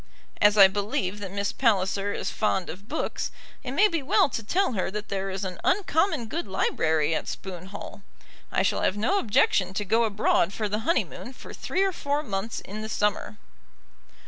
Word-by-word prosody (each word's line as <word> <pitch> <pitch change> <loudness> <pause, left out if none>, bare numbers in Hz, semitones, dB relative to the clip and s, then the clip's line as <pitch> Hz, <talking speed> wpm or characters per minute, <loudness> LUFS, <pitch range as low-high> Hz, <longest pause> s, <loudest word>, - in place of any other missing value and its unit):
As 210 0 +5
I 195 -1 +10
believe 200 0 -2
that 200 -2 -5
Miss 200 0 -1
Palliser 200 -4 +1
is - - -3
fond 195 -4 0
of 200 +5 -12
books, 315 - -2 0.3
it 250 - -4
may 400 +9 +5
be 335 -6 -2
well 270 - +3
to 230 - -3
tell 365 - +1
her 190 -3 -1
that 210 +2 -6
there 195 0 -2
is 190 +1 -3
an 185 -2 -5
uncommon 325 - +1
good 310 +7 -4
library 160 -4 +1
at - - -2
Spoon 185 -1 -6
Hall. 200 +1 -9 0.5
I - - +2
shall - - +1
have 195 - +1
no 370 - +2
objection 190 - +2
to 205 - -1
go 225 +4 +3
abroad 200 -3 +2
for 215 0 -2
the 210 +1 -1
honeymoon 255 - -1
for - - -11
three 380 - -1
or 390 - +2
four 290 -3 -2
months 200 -2 -3
in 210 +3 -7
the 220 - -5
summer. 205 - -1
205 Hz, 195 wpm, -26 LUFS, 190-250 Hz, 0.5 s, I